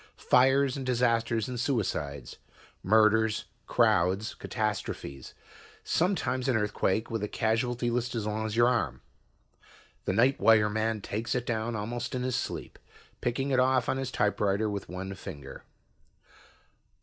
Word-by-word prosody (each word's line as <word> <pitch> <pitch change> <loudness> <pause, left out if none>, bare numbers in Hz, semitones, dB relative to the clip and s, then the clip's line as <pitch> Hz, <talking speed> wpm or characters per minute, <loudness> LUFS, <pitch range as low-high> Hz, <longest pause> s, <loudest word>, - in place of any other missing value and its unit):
Fires 135 +1 +3
and 135 - -4
disasters 115 -3 +1
and 125 -2 -4
suicides. 75 - -2 0.4
Murders, 110 +1 +3 0.2
crowds, 95 +6 +2
catastrophes. 105 - -4 0.5
Sometimes 160 -8 0
an 125 -4 +3
earthquake 105 0 0
with 115 -2 -2
a 105 - -1
casualty 120 +3 0
list 120 +1 -1
as 110 -3 -2
long 110 +1 -2
as 105 - -4
your 120 +1 +5
arm. 125 -2 -1 1.0
The - - 0
night 125 +6 +3
wire 110 -2 +5
man 110 0 -1
takes 110 +5 -3
it 125 -1 -1
down 115 0 -2
almost 120 +3 -4
in 125 - -2
his 130 -1 -1
sleep, 125 - -4 0.4
picking 135 +3 -1
it 130 - +3
off 130 -1 +3
on - - 0
his 135 -1 -3
typewriter 105 -1 +1
with 100 -1 -5
one 95 +2 -5
finger. 70 -6 -9
115 Hz, 140 wpm, -29 LUFS, 105-125 Hz, 1.0 s, your